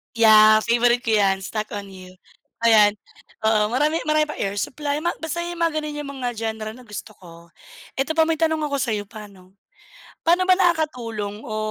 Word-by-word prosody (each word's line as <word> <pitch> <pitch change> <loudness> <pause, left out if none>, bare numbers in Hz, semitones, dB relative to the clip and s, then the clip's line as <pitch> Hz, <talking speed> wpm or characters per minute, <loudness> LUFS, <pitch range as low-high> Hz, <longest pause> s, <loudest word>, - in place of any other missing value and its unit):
Yeah, 215 -1 +6
favorite 240 +1 +2
ko 225 - -1
'yan 195 -1 +2
"Stuck 215 +2 -4
on 200 -1 -7
You." 185 -1 -13 0.5
Ayan, 210 -3 +5 0.5
oo 215 -1 +2
marami 300 +7 +1
marami 305 0 +3
pa - - -4
Air 195 0 -2
Supply 285 +6 -3
basta 340 -1 -3
mga 340 -1 -1
ganun 300 0 -5
'yong 290 -1 -6
mga 245 - -1
genre 220 -1 -4
na 250 +1 -15
gusto 210 +1 -8
ko. 170 -1 -15 0.5
Eto 275 +4 -1
pa 320 - +6
may 320 -1 -1
tanong 320 -1 +1
ako 285 -1 -2
sa'yo, 215 -5 -1
paano, 200 -3 -13 0.7
paano 350 +2 +3
ba 370 - +6
nakakatulong 245 - -1
o 215 -2 -6
230 Hz, 175 wpm, -22 LUFS, 210-305 Hz, 0.7 s, Yeah